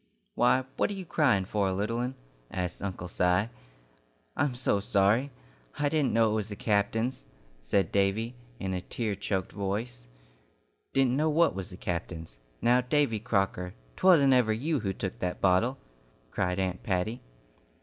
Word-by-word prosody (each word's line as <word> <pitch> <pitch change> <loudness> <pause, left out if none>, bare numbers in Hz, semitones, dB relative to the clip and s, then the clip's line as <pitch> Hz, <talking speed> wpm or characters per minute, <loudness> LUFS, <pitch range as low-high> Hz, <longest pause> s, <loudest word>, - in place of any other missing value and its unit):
"Why, 125 +2 +3
what - - +2
are - - -3
you 190 -2 -6
crying 125 - +2
for, 100 0 0
little 105 +5 -1
'un?" 125 +2 -2 0.3
asked 90 -2 -4
Uncle 95 -2 -4
Si. 90 +4 +1 0.9
"I'm 140 -4 0
so 120 -5 +1
sorry. 105 +7 +2 0.5
I 145 - +1
didn't 150 -2 +1
know 115 -1 +3
it - - 0
was 110 -1 -1
the 105 - -5
captain's," 110 +4 0 0.4
said 95 +5 +1
Davy, 100 +4 +1 0.3
in 95 -1 -2
a 90 - -2
tear 110 +3 -3
choked 95 -1 -2
voice. 100 - -4 0.8
"Didn't 130 -2 +3
know 155 +2 +2
what 165 +2 +3
was 95 -1 -5
the 90 - -10
captain's? 85 -8 -5 0.2
Now, 125 +1 +5
Davy 125 -3 +1
Crocker, 95 -5 -1 0.2
'twasn't 155 -8 +6
ever 125 -4 +4
you 145 +7 0
who 100 -3 -2
took 95 0 -5
that 90 0 -2
bottle?" 100 +8 +3 0.5
cried 90 0 -1
Aunt 95 -1 -1
Patty. 100 +5 -1
105 Hz, 160 wpm, -29 LUFS, 95-125 Hz, 0.9 s, twasn't